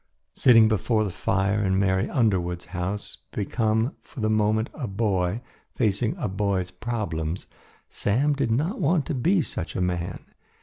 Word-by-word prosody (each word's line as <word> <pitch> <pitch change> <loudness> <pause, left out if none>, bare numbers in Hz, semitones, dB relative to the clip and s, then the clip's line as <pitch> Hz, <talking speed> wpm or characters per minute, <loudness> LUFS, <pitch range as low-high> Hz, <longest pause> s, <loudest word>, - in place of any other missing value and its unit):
Sitting 115 -4 +6
before 110 +1 +1
the 100 - -2
fire 100 +3 0
in 95 -1 +2
Mary 95 -1 +2
Underwood's 90 -8 0
house, 95 +4 -3
become, 110 +4 0
for 135 - -12
the 110 -1 +1
moment, 110 +1 +1
a 135 -6 -4
boy, 100 0 0 0.3
facing 110 0 +1
a - - -2
boy's 95 -2 -1
problems, 90 -6 -3 0.4
Sam 135 +9 +1
did 140 -4 0
not 155 - 0
want 155 0 +2
to 165 - -2
be 165 +7 +2
such 85 - -5
a - - -1
man. 90 -1 -2
105 Hz, 155 wpm, -25 LUFS, 95-120 Hz, 0.4 s, Sitting